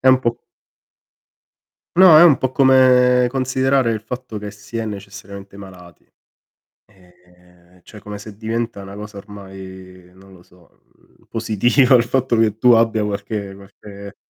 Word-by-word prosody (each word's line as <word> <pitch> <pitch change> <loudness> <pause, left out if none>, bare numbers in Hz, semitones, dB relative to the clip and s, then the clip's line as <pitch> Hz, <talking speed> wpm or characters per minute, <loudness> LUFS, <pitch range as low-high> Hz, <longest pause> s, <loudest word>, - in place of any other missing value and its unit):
È 130 - +2
un 130 - +5
po' 120 -2 -2 1.6
No, 185 -4 +7
è 155 - +8
un 160 -6 +6
po' 130 -1 -2
come 125 -2 +4
considerare 130 -1 0
il 110 - -3
fatto 120 0 -8
che 105 0 -8
si 105 +2 -11
è 115 - -3
necessariamente 100 -1 -10
malati. 90 -3 -15 0.9
Ehm, 90 -1 -26
cioè 105 - -15
come 105 0 -9
se 105 0 -12
diventa 115 -1 -4
una 100 0 -11
cosa 105 0 -10
ormai 95 -3 -13
non 95 +1 -19
lo 90 - -18
so, 90 -1 -26
mhmm, - - -30
positiva 120 +4 +2
il 115 - +4
fatto 125 0 -1
che 110 -2 +1
tu 125 +1 +4
abbia 115 -2 +2
qualche 100 -1 -5
qualche 100 +1 -13
105 Hz, 150 wpm, -18 LUFS, 95-125 Hz, 1.6 s, è